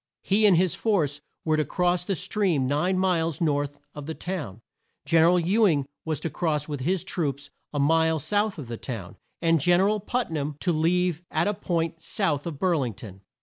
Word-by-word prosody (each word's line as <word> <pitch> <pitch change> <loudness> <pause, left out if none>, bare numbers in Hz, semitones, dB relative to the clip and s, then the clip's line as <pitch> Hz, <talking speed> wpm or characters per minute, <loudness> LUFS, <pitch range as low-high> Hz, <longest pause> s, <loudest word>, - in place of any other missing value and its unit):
He 210 +2 +4
and 185 -4 +5
his 180 0 +2
force 155 -10 0 0.2
were 155 -1 +2
to 155 - +2
cross 180 +1 0
the 195 +2 -1
stream 180 -6 0
nine 150 +8 +1
miles 165 -5 +1
north 145 -3 0
of 145 -1 -8
the 160 - -4
town; 145 - -5 0.4
Gen 165 +2 +4
er 165 - +6
al 180 +1 +4
Ew 205 +6 +3
ing 145 -6 +1 0.2
was 155 -3 -1
to 165 - -2
cross 150 -2 -1
with 145 -3 -4
his 180 +7 0
troops 145 -6 -3 0.2
a 145 - -4
mile 160 +3 +3
south 205 +6 0
of 145 -6 -7
the 115 0 -5
town; 110 -9 -7 0.3
and 165 -2 +3
Gen 175 +3 +4
er 195 - +4
al 210 0 +1
Put 240 +1 -2
nam 150 -1 -2
to 180 - +1
leave 170 +1 +1
at - - +1
a 205 - +1
point 165 -3 -2
south 165 -7 -1
of 160 -4 -5
Bur 180 +1 +2
ling 125 -7 -2
ton. 95 -2 -11
165 Hz, 215 wpm, -26 LUFS, 145-185 Hz, 0.4 s, er